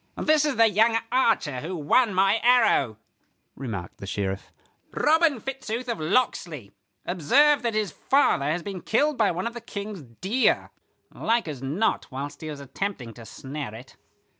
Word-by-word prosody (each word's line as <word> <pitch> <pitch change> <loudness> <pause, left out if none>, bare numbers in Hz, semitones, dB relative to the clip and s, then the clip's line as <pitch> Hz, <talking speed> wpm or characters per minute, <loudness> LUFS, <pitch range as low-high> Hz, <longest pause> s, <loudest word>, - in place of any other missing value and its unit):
"This 305 -1 +3
is 295 -3 0
the 230 - +5
young 225 +2 +3
archer 225 - +1
who 180 +4 -5
won 190 - +2
my 195 +4 +3
arrow," 230 - +3 0.6
remarked 110 -9 -6
the 100 - -8
Sheriff. 95 -1 -3 0.4
"Robin 315 -3 +3
Fitzooth 255 -1 -5
of 235 -3 -3
Locksley. 155 - -1 0.3
Observe 265 - +3
that 235 -2 -2
his 210 -5 0
father 265 - +2
has 160 +4 -1
been 195 -3 -6
killed 295 - +1
by 220 -5 +2
one 180 +2 -3
of 235 - -3
the 240 - -7
King's 205 -4 -7
deer; 185 - 0 0.4
like 230 -4 0
as 145 -5 -6
not 155 +12 -1
whilst 140 +2 -6
he 155 - -6
was 150 -2 -7
attempting 140 - -5
to 115 -1 -12
snare 135 -4 -7
it. 125 +4 -13
195 Hz, 165 wpm, -25 LUFS, -, 0.6 s, the